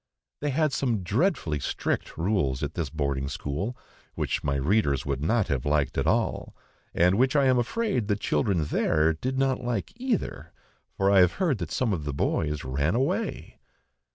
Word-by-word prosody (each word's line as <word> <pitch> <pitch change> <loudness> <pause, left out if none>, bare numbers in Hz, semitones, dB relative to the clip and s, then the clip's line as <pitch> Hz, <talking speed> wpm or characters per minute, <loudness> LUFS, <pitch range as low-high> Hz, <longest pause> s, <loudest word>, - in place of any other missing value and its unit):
They 145 - -1
had 150 +1 +1
some 115 -8 0
dreadfully 100 - 0
strict - - -2
rules 75 -8 0
at 70 +2 -3
this 80 -5 -3
boarding 70 -2 -2
school, 80 - -4 0.4
which - - -2
my 70 -1 0
readers 70 - +1
would 70 -1 -2
not 110 +6 +1
have 65 -3 0
liked 75 -1 +1
at - - 0
all, - - 0 0.4
and 90 +5 +3
which 130 +3 +3
I 140 -2 +4
am 130 -1 +4
afraid 125 - -1
the 105 - +2
children 100 - 0
there 80 +2 +2
did 130 +11 -3
not 135 -1 +1
like 120 -5 -2
either, 225 - -3 0.4
for 100 0 +3
I 100 - +6
have 90 -1 +5
heard 165 - 0
that 85 -4 -4
some 115 +1 0
of 80 -5 -3
the 75 - -2
boys 75 +1 -1
ran 70 +8 0
away. 130 +3 -2
95 Hz, 180 wpm, -27 LUFS, -, 0.4 s, I